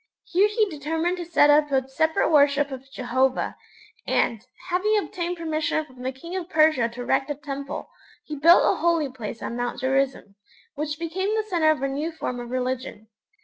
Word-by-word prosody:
Here 380 +4 +3
he 425 0 +1
determined 325 +2 -2
to 350 - -5
set 310 -3 +5
up 295 0 +4
a 265 -1 +1
separate 315 +5 +1
worship 285 -1 +4
of 265 +1 -8
Jehovah, 260 0 0 0.5
and, 225 -2 +1 0.3
having 400 +5 +2
obtained 355 -4 -3
permission 310 -1 -1
from 255 -3 -15
the 260 +1 -2
king 335 +8 -9
of 360 -2 -4
Persia 310 -8 +3
to 235 +1 -8
erect 270 +3 0
a 290 - -2
Temple, 280 0 -6 0.4
he 305 - -6
built 330 +5 +6
a - - +2
Holy 335 -4 +2
Place 230 -3 -7
on 235 - -4
Mount 245 0 -3
Gerizim, 265 -6 -1 0.4
which 300 +1 -3
became 340 +4 -2
the 440 - +1
centre 340 -6 +2
of 305 -3 +1
a - - +2
new 290 +5 -3
form 250 -6 -4
of 240 0 -7
religion. 255 -3 -4
295 Hz, 190 wpm, -24 LUFS, 260-335 Hz, 0.5 s, built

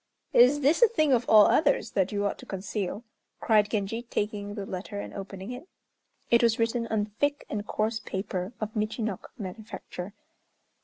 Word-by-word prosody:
"Is 255 +5 +6
this 295 - +3
a 475 - +9
thing 310 - +2
of 245 -1 +1
all 215 -2 +8
others 285 -6 +2
that 190 -1 +1
you 205 -1 -1
ought 200 - -2
to - - -11
conceal," 200 +2 -4 0.4
cried 210 -2 +3
Genji, 215 +2 -2
taking 205 -3 -3
the 200 -3 -4
letter 195 +2 -5
and - - -7
opening 195 +1 -7
it. 250 +8 -8 0.6
It 235 - +6
was 230 -1 +3
written 230 +1 0
on 210 -2 -1
thick 285 0 0
and 210 -1 -3
coarse 220 +1 -1
paper 190 -1 -4
of 215 +1 -4
Michinok 215 -1 -2
manufacture. 200 -2 -7
215 Hz, 170 wpm, -28 LUFS, 200-235 Hz, 0.6 s, a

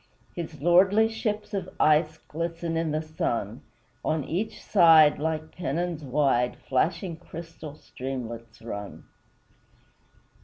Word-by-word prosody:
His 165 -3 -6
lordly 190 +6 +5
ships 215 -1 -3
of 190 -2 -3
ice 155 +1 +3
Glisten 165 +1 -3
in 165 0 0
the 155 +1 -1
sun; 120 -8 -3 0.4
On 155 -2 0
each 185 +10 -3
side, 165 -6 +6
like 160 0 -3
pennons 170 0 -2
wide, 130 -3 +1
Flashing 165 +5 0
crystal 165 -3 -9
streamlets 120 -6 -7
run. 100 -3 -7
160 Hz, 110 wpm, -27 LUFS, 140-175 Hz, 0.4 s, side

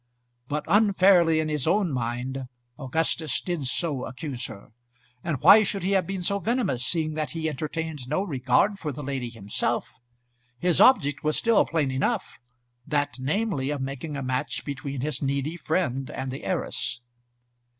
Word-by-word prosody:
But 150 +2 -2
unfairly, 190 -6 +5
in 155 - 0
his 150 -2 -1
own 190 0 +2
mind, 125 +1 -3 0.3
Augustus 155 +2 0
did 175 -6 -3
so 140 0 -1
accuse 130 -1 -5
her. 105 0 -12 0.5
And 155 -6 -2
why 215 - +9
should 200 -2 -2
he 190 - 0
have 190 -4 +2
been 195 -2 -3
so 200 +3 +1
venomous, 230 - 0
seeing 155 +2 0
that 155 -1 -3
he 160 -1 -1
entertained 155 -1 -4
no 155 +8 0
regard 145 +6 +1
for 150 - -3
the 145 +2 -7
lady 130 -3 -3
himself? 115 +3 -3 0.6
His 175 +4 +2
object 145 - +5
was 155 0 +2
still 230 -2 +4
plain 150 -5 0
enough, 185 - -1 0.5
that, 145 -2 0
namely, 145 0 -1
of 145 -1 -2
making 140 +3 -4
a 135 - -3
match 130 0 -2
between 140 -2 -4
his 150 +3 -2
needy 140 +3 -1
friend 150 -6 -1
and 130 0 -4
the 135 - -7
heiress. 120 - -2
150 Hz, 160 wpm, -26 LUFS, 130-175 Hz, 0.6 s, why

